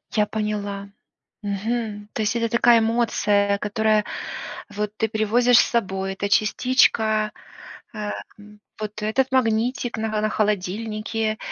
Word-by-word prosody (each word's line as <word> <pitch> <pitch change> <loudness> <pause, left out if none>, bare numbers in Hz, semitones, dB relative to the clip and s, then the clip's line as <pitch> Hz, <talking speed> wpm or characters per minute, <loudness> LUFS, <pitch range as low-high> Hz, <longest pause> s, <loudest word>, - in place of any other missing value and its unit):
Я 210 -1 +4
поняла, 205 -2 -3 0.5
мгм, 210 +1 -3
то - - -4
есть 215 +2 0
это 230 -1 0
такая 235 0 +5
эмоция, 210 -3 +2
которая, 215 +1 +1 0.7
вот, 210 0 -3
ты 220 - +1
привозишь 230 +3 +3
с - - +3
собой, 195 -4 -1
эта 200 +1 -2
частичка, 215 -1 +2 0.6
ам, 210 -1 -3 0.7
вот 210 0 -5
этот 260 +5 0
магнитик 245 0 +1
на 220 0 -1
холо 215 0 0
на 215 - +2
холодильнике 215 +2 -1
215 Hz, 125 wpm, -23 LUFS, 205-230 Hz, 0.7 s, такая